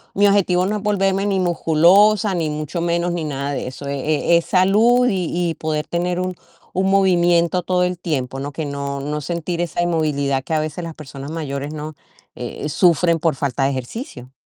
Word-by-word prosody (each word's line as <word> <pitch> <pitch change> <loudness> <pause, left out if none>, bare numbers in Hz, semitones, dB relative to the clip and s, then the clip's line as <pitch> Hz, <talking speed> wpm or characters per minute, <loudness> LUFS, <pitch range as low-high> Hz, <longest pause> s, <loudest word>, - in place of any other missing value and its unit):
mi 205 +1 +4
objetivo 185 -2 +3
no 210 +2 -1
es - - -6
volverme 195 -1 +1
ni 195 -2 +1
musculosa, 185 +5 +4
ni 165 -3 -1
mucho 155 +3 -4
menos, 170 +1 0
ni 170 -2 -3
nada 140 -1 -3
de 130 - -3
eso. 130 +2 -8
E-e-es 155 +4 +1
salud 220 +7 +4
y 185 -6 0 0.2
y - - -3
poder 155 -1 -2
tener 175 +1 -1
un 185 0 -2 0.4
un 190 +1 +1
movimiento 175 -2 +3
todo 180 0 +1
el 180 0 -1
tiempo, 135 -6 -3
¿no? 145 +1 -4
Que 155 +1 -4
no 140 -1 -4
no 150 +2 -3
sentir 170 +2 -3
esa 175 0 -2
inmovilidad 145 -5 0
que 160 - -4
a 155 - +2
veces 155 +3 -4
las 165 -1 -7
personas 140 0 -9
mayores, 145 -2 -4
¿no? 155 0 -6 0.4
Eh, 125 +4 -5
sufren 170 0 +3
por 160 -2 +1
falta 135 0 -1
de 135 - +3
ejercicio. 130 - -6
170 Hz, 190 wpm, -20 LUFS, 145-185 Hz, 0.4 s, mi